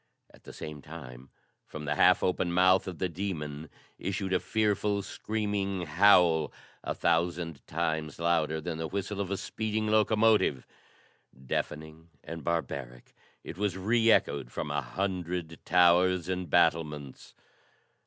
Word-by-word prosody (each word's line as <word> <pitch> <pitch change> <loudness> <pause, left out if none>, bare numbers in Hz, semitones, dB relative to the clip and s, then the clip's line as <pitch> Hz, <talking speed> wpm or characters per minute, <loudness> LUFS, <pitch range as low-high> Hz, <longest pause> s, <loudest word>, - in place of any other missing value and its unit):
At - - -20
the - - -9
same 75 -2 -8
time, 65 -4 -11 0.4
from 75 -1 -7
the 75 - 0
half 90 +4 +4
open 90 -1 0
mouth 95 +2 +4
of 90 -3 -5
the 95 - 0
demon 80 -5 -5 0.3
issued 95 0 -2
a 90 - +3
fearful, 105 -2 0
screaming 100 -3 -2
howl, 85 -1 +4 0.3
a - - -3
thousand 85 -3 0
times 80 -2 -2
louder 85 -2 +1
than 80 0 -5
the 80 - -2
whistle 100 +3 -3
of 95 - -3
a 100 - -1
speeding 110 +1 -3
locomotive. 110 - +3 0.8
Deafening 80 +5 -4
and 80 -1 -7
barbaric, 70 -7 -4 0.3
it - - -8
was 100 -3 -1
reechoed 105 - +2
from - - -4
a - - 0
hundred 90 +2 -3
towers 90 0 +4
and 90 -2 -3
battlements. 75 -4 0
85 Hz, 135 wpm, -29 LUFS, 80-95 Hz, 0.8 s, half